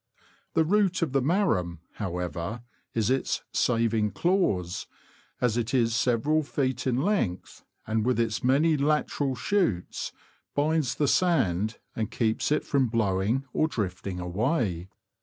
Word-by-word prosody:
The 160 - +5
root 190 -1 +2
of 155 - -1
the 135 0 +2
marram, 135 - +1 0.2
however, 90 +3 -4 0.3
is 110 +1 +1
its 135 0 0
" - - -51
saving 115 -3 +1
clause," 105 - 0 0.5
as 120 -2 +1
it 120 +2 -1
is 115 -2 +2
several 130 +6 +2
feet 135 -3 -2
in 130 +2 +1
length, 175 - -1 0.2
and, 110 0 0
with 125 +1 +1
its 115 -2 0
many 145 +6 +4
lateral 145 -2 0
shoots, 125 - -1 0.4
binds 145 -3 +1
the 145 - +1
sand, 110 - +2 0.2
and 110 -2 -2
keeps 110 +4 0
it 150 - +1
from 135 -3 +2
blowing 110 +3 0
or 155 - +2
drifting 95 - -3
away. 95 - -1
120 Hz, 140 wpm, -27 LUFS, 105-150 Hz, 0.5 s, The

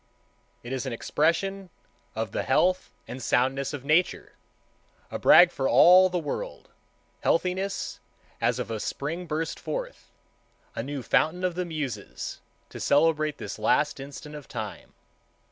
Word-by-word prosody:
It 120 +2 -6
is 130 0 -3
an 130 - -3
expression 180 +9 0 0.5
of 110 -2 -3
the - - -1
health 180 +7 +2 0.2
and 130 - -7
soundness 135 +3 +1
of 140 -2 -7
Nature, 160 +5 +1 0.8
a - - -4
brag 175 0 +7
for 135 - -1
all 185 +2 +7
the 180 - -1
world,—healthiness 185 - -3 0.4
as - - +2
of - - -4
a 110 - -3
spring 165 +10 -4
burst 160 +1 -3
forth, - - -6 0.7
a - - -2
new 140 +1 -5
fountain 170 +9 +1
of 180 -1 +1
the 180 +1 -2
Muses, 140 - -5 0.3
to - - -9
celebrate 155 0 +2
this - - -7
last - - +2
instant 140 +2 -9
of 150 -2 -9
time. 105 -6 -7
155 Hz, 140 wpm, -27 LUFS, 135-180 Hz, 0.8 s, brag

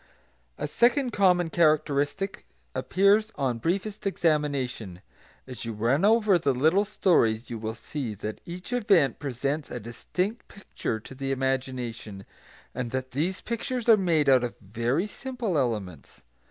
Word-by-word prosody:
A - - -3
second 245 - +2
common 180 -5 +3
characteristic 155 +3 +1 0.3
appears 205 +4 +3
on 125 -4 -1
briefest 195 - -2
examination. 140 - -1 0.4
As 125 -4 -8
you 115 -1 -4
run 120 - +1
over 210 -3 +4
the 140 -5 +1
little 160 +10 +3
stories 125 - +2
you 115 - -4
will 110 +1 -4
see 120 -2 -5
that 105 +2 -6
each 180 +7 -7
event 195 - +3
presents 140 +2 -2
a 125 - -5
distinct 180 - -4
picture 190 - -5
to 110 - -12
the 135 +1 -3
imagination, 130 -6 -3 0.5
and 125 -2 -3
that 130 +1 -4
these 170 +8 -1
pictures 240 +1 -3
are 225 - +9
made 170 -7 +2
out 130 -2 +5
of 120 - -3
very 115 - -1
simple 240 -4 -4
elements. 105 - -3
145 Hz, 140 wpm, -27 LUFS, 120-195 Hz, 0.5 s, are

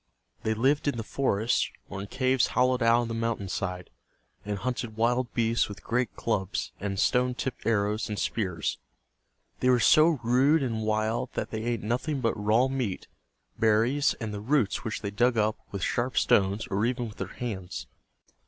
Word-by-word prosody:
They 110 0 0
lived 135 +6 +2
in 140 - 0
the 115 - -3
forests, 115 -2 0 0.2
or 95 - -6
in 100 - -6
caves 130 +2 +2
hollowed 125 0 +3
out 115 +1 +4
of - - -4
the 115 - -4
mountain 115 -4 -2
side, 90 -1 -4 0.5
and 105 0 -3
hunted 120 -1 -3
wild 120 +2 +1
beasts 115 -2 +2
with 100 - -9
great 125 -1 -1
clubs 100 -4 -2
and 100 0 -3
stone 125 0 +2
tipped 130 0 -4
arrows 105 -1 +1
and 105 - -3
spears. 90 -8 -2 0.8
They 125 - +2
were 125 -1 +5
so 155 +4 +5
rude 135 +6 +4
and 115 -4 -2
wild 110 +3 0
that - - -3
they 110 - -3
ate 115 -1 -2
nothing 125 +7 -1
but 115 -3 +1
raw 110 +5 +2
meat, 130 -8 -3 0.5
berries, 115 +7 +3
and 110 -3 -5
the 100 - -5
roots 125 -2 +1
which 110 - -4
they 100 - -2
dug 120 +3 +2
up 110 0 +1
with 100 -3 -5
sharp 125 +1 -1
stones 100 +2 +3
or 100 +2 +1
even 120 0 0
with 105 - -11
their - - -3
hands. 95 - -5
115 Hz, 180 wpm, -28 LUFS, 105-125 Hz, 0.8 s, were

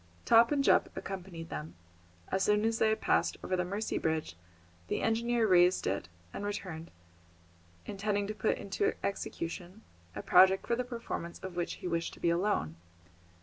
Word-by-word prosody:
Top 230 +2 +6
and 285 -1 +2
Jup - - +4
accompanied 180 -4 -6
them. 80 +3 -6 0.5
As 190 - 0
soon 210 +1 +3
as 225 0 0
they 220 - +4
had 220 - 0
passed - - +1
over 185 - -1
the 180 - 0
Mercy 200 +4 -2
Bridge, 160 - -1 0.5
the - - -2
engineer 235 +1 +2
raised 180 -1 +4
it 95 -3 -2 0.2
and - - -5
returned, 180 -5 -5 1.0
intending 205 0 -1
to 210 - -4
put 215 +1 0
into 200 0 -1
execution 185 +1 -4 0.3
a - - -5
project 190 +1 +6
for 235 - +1
the 250 - -1
performance 230 -8 -5
of 190 -2 -6
which 175 -1 -2
he - - 0
wished 170 -1 -2
to - - -16
be 170 - +2
alone. 170 - 0
190 Hz, 170 wpm, -31 LUFS, 170-215 Hz, 1.0 s, Top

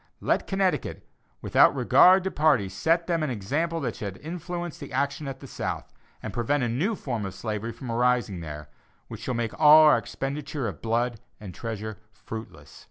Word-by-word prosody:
Let - - 0
Connecticut, 190 -5 -1 0.4
without - - +5
regard 185 +1 +6
to 190 - -2
party, 145 -11 +2
set 165 - +1
them 170 -2 0
an 155 - -1
example 145 - -2
that - - -3
shall 100 -3 -5
influence 175 +1 -5
the - - -9
action 140 +2 -1
at 135 -1 -6
the - - -9
South, - - -5 0.3
and - - -5
prevent 125 +4 0
a 120 - 0
new 170 - 0
form 120 - -4
of 95 -1 -5
slavery 110 +2 -4
from 115 +1 -7
arising 120 -5 +1
there, 75 -2 -7 0.4
which - - -8
shall 130 - -3
make 115 -2 -2
all 155 0 +9
our 150 - +6
expenditure 140 -1 -4
of 100 - -7
blood 115 +1 0 0.2
and 100 -4 -9
treasure 110 -1 -6
fruitless. 110 -10 -10
125 Hz, 180 wpm, -26 LUFS, 110-155 Hz, 0.4 s, all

